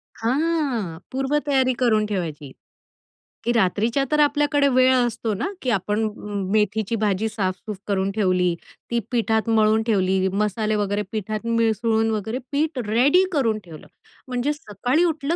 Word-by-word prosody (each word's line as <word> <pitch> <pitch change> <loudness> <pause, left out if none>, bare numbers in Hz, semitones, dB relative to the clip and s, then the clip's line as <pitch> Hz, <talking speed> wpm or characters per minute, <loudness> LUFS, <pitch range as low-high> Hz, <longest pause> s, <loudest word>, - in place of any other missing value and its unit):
हां, 255 - -1
पूर्व 270 +3 0
तयारी 265 -2 +3
करून 220 -4 +3
ठेवायची. 160 -9 -4 0.9
की 240 - +2
रात्रीच्या 225 +5 +1
तर 300 - +2
आपल्याकडे 290 0 +3
वेळ 255 -1 +4
असतो 240 -3 0
ना, 200 - -2
की 255 - -2
आपण 210 +1 0
अ, - - -2 0.4
मेथीची 215 +1 +1
भाजी 210 +1 +1
साफ-सूफ 200 -1 -3
करून 195 -1 0
ठेवली, 185 -4 +1 0.4
ती 235 - +2
पिठात 225 -2 +1
मळून 220 0 +3
ठेवली, 190 -3 +2
मसाले 210 +1 0
वगैरे 205 0 0
पिठात 215 +1 -4
मिसळून 225 -1 +1
वगैरे 220 +3 -2
पीठ 295 -1 0
रेडी 275 - +4
करून 230 -8 +1
ठेवलं, 160 -3 -12 0.4
म्हणजे 250 +3 -1
सकाळी 260 - -1
उठलं 315 -1 -1
225 Hz, 140 wpm, -23 LUFS, 205-260 Hz, 0.9 s, वेळ